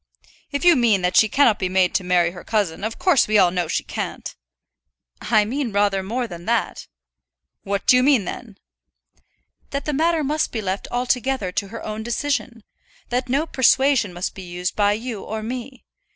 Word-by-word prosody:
"If 285 +4 -2
you 350 -2 +7
mean 225 -7 +2
that 180 0 0
she 220 - +5
cannot 240 -6 +3
be 185 - -1
made 185 -1 +2
to - - 0
marry 175 -1 +2
her 175 -1 -11
cousin, 205 -5 -1
of 220 +1 -3
course 360 -8 +3
we 215 0 +3
all 185 -3 +5
know 180 -2 -1
she - - -1
can't." - - -6 0.9
"I 215 -2 +2
mean 255 +2 -3
rather 200 -1 +1
more 235 +6 -3
than 175 -6 -9
that." - - -1 0.7
"What 200 0 -3
do 250 - +6
you - - +4
mean, 260 -6 +3
then?" 220 0 -8 1.1
"That 280 0 -4
the 300 - -2
matter 320 +2 +1
must 300 +3 -1
be 225 - -3
left 195 -1 -3
altogether 250 -4 -1
to 200 - -2
her 225 +3 -8
own 215 0 -4
decision; 240 0 -3 0.5
that 250 +1 -2
no 280 +5 +1
persuasion 265 - +3
must 175 +1 -4
be 195 - -9
used 180 0 -4
by 205 -1 +3
you 225 -1 -5
or 220 0 -5
me. 250 +3 -7
220 Hz, 190 wpm, -22 LUFS, 195-260 Hz, 1.1 s, you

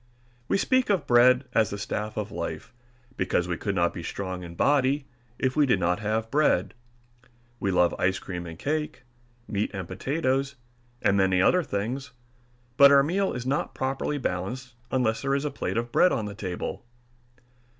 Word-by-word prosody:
We - - +2
speak 255 +4 +2
of 200 -3 +1
bread 125 +2 +5
as 110 -3 +3
the 100 - -5
staff 105 +1 -4
of 105 -1 -3
life 115 - -5 0.4
because 90 - 0
we 90 - -1
could 100 +3 -3
not 85 -1 +2
be 85 - -6
strong 95 +1 -5
in 85 -1 -9
body 140 - +2 0.3
if 130 0 0
we 150 -2 +4
did 110 -7 +3
not 90 +1 +1
have 110 +1 -2
bread. 145 -11 +2 0.9
We 100 - -1
love 90 -2 +3
ice 95 +1 +2
cream 90 -2 -6
and 80 -1 -8
cake, 150 - -3 0.4
meat 105 0 -1
and 95 -3 -5
potatoes, 135 - -1 0.5
and 100 - +3
many 95 -1 +3
other 180 - +4
things, 125 - -4 0.6
but 140 0 +9
our 140 -1 +7
meal 190 +6 0
is 125 0 -5
not 135 +3 -1
properly 135 +2 -2
balanced 125 +3 -4 0.2
unless 120 -4 0
there 135 0 +1
is 140 +1 -1
a 150 - -1
plate 135 - -3
of 120 +1 -2
bread 180 - +5
on 110 - -1
the 105 - -5
table. 95 0 -5
115 Hz, 180 wpm, -26 LUFS, 95-140 Hz, 0.9 s, but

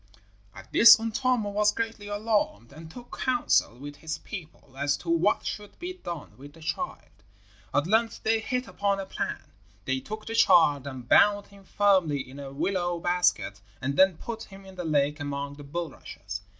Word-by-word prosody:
At 95 - -13
this 230 0 +9
Untamo 225 -1 0
was 210 +1 +3
greatly 225 -2 -4
alarmed, 205 - -1
and 160 +2 -11
took 245 +8 -11
counsel 265 - +1
with 145 +2 -9
his 160 -1 -5
people 155 -8 -10
as 145 +1 0
to 165 +2 -4
what 170 +5 +2
should 205 -1 -6
be 360 +1 -5
done 170 - -8
with 145 +2 -12
the 165 - -16
child. 160 - -5 0.5
At 145 +2 +1
length 225 +5 +1
they 225 0 +2
hit 250 +3 -2
upon 200 -1 -1
a 195 - -4
plan. - - -5 0.3
They 130 0 0
took 215 +8 -7
the 225 - -5
child 145 - +5
and 130 -3 -8
bound 205 +6 +5
him 200 -1 -17
firmly 185 -11 +2
in 135 +2 -11
a 140 -1 -7
willow 175 +3 -1
basket 175 - +1 0.2
and 140 +2 -2
then 190 -1 +5
put 225 -1 -6
him 195 0 -14
in 190 - -12
the 180 -2 -6
lake 150 -1 +1
among 140 0 -4
the 145 - -10
bulrushes. 140 - -6
175 Hz, 180 wpm, -27 LUFS, 145-210 Hz, 0.5 s, this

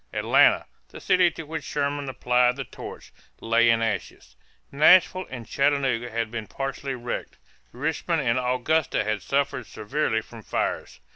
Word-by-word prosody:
Atlanta, - - +4 0.2
the - - -11
city 185 -2 +3
to 165 - -8
which 160 +1 -6
Sherman 145 -1 -2
applied 125 -1 +2
the 135 - -4
torch, - - -10 0.3
lay 115 +1 +3
in 115 0 +3
ashes; 100 - -4 0.4
Nashville 180 +5 +5
and 125 -3 -7
Chattanooga 135 -2 0
had 115 -1 -3
been 110 -3 -5
partially 135 0 -4
wrecked; 120 -1 -5 0.3
Richmond 160 +4 -1
and 115 +1 +1
Augusta 130 +5 0
had 110 -1 -2
suffered 135 +1 -1
severely 110 0 -1
from 115 0 -13
fires. - - -3
130 Hz, 145 wpm, -25 LUFS, 115-145 Hz, 0.4 s, Nashville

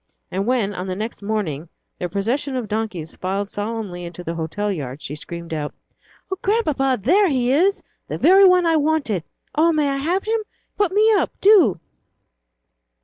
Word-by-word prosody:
And 195 +3 -2
when, 235 -5 +1
on 185 0 -5
the 185 - -3
next 215 +3 -5
morning, 185 -8 -3 0.3
their 180 - -3
procession 240 - -1
of 245 -4 -3
donkeys 210 -7 -4
filed 195 +2 -2
solemnly 205 -4 -4
into 175 +1 -8
the 165 - -3
hotel 170 +6 -2
yard, 140 -6 -5
she 150 - -6
screamed 170 +2 -7
out, 150 -2 -4 0.6
"Oh, 380 - -3
Grandpapa, 300 - +1
here 380 - +4
he 255 -3 +1
is, 370 +8 +2 0.2
the - - -4
very 385 +2 +7
one 365 -1 +5
I 325 -1 +3
wanted! 290 - 0 0.3
Oh, 325 +2 +4
may 305 -2 +1
I 275 - -1
have 345 +8 0
him? 445 +1 0 0.3
Put 410 -4 +1
me 420 +3 +4
up, 410 - +2
do!" 370 - +5
225 Hz, 175 wpm, -21 LUFS, -, 0.6 s, very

